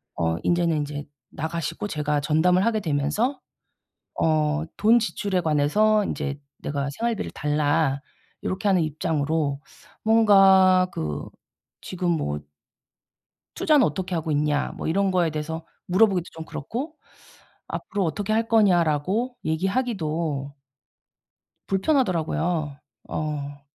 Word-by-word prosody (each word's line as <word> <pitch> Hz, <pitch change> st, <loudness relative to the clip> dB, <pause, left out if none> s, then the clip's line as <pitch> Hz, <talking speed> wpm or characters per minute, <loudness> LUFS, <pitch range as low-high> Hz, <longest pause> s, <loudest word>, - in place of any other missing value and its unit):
어 80 Hz, 0 st, 0 dB
인제는 170 Hz, -2 st, +2 dB
인제 145 Hz, 0 st, -4 dB, 0.3 s
나가시고 165 Hz, +3 st, -3 dB
제가 150 Hz, -2 st, 0 dB
전담을 180 Hz, +6 st, +3 dB
하게 230 Hz, -2 st, +2 dB
되면서 160 Hz, -, 0 dB, 0.8 s
어 155 Hz, 0 st, +2 dB
돈 230 Hz, +3 st, +5 dB
지출에 200 Hz, -4 st, -1 dB
관해서 190 Hz, +8 st, +3 dB
인제 140 Hz, -5 st, -3 dB, 0.2 s
내가 140 Hz, -1 st, -3 dB
생활비를 235 Hz, -2 st, -1 dB
달라 150 Hz, -1 st, +1 dB, 0.4 s
요렇게 190 Hz, +2 st, -2 dB
하는 185 Hz, -3 st, +4 dB
입장으로 155 Hz, -2 st, -1 dB, 0.4 s
뭔가 195 Hz, -4 st, +6 dB
그 75 Hz, -2 st, -4 dB, 0.5 s
지금 180 Hz, -1 st, -2 dB
뭐 75 Hz, -, -1 dB, 1.1 s
"투자는 295 Hz, -5 st, +4 dB
어떻게 185 Hz, +4 st, -2 dB
하고 160 Hz, -1 st, -2 dB
있냐?" 150 Hz, 0 st, +1 dB
뭐 -, -, -4 dB
이런 195 Hz, +4 st, +1 dB
거에 175 Hz, -3 st, +2 dB
대해서 160 Hz, +1 st, -5 dB, 0.2 s
물어보기도 185 Hz, -1 st, +3 dB
좀 160 Hz, 0 st, -8 dB
그렇고 270 Hz, -, -5 dB, 0.7 s
"앞으로 205 Hz, -2 st, -3 dB
어떻게 205 Hz, +6 st, -1 dB
할 225 Hz, +1 st, +1 dB
거냐?"라고 195 Hz, -, +2 dB
얘기하기도 160 Hz, -, -1 dB, 1.1 s
불편하더라고요. 180 Hz, -, 0 dB, 0.3 s
어. 145 Hz, -2 st, -4 dB
165 Hz, 265 characters per minute, -24 LUFS, 150-200 Hz, 1.1 s, 뭔가